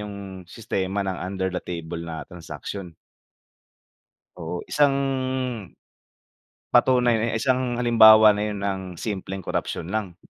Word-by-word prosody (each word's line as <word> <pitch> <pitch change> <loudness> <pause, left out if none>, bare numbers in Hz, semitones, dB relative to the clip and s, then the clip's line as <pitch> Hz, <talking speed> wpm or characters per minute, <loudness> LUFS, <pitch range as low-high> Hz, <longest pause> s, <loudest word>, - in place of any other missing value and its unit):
'yung 105 -1 -6 0.3
sistema 100 -1 -3
ng 95 -1 -3
under 95 0 -3
the 90 - -2
table 85 -1 -6
na 85 -1 -6
transaksyon. 90 +1 -8 1.4
Oo, 80 +2 -5
isang, 145 -2 +2 1.8
patunay 125 -2 +4
na 115 +1 -1
isang 125 0 0
halimbawa 110 -2 +8
na 105 - -2
'yun 105 -2 -4
ng 100 -1 -2 0.2
simpleng 95 -2 -4
korapsyon 80 - -3
lang. 95 -3 -3
100 Hz, 115 wpm, -24 LUFS, 90-115 Hz, 1.8 s, halimbawa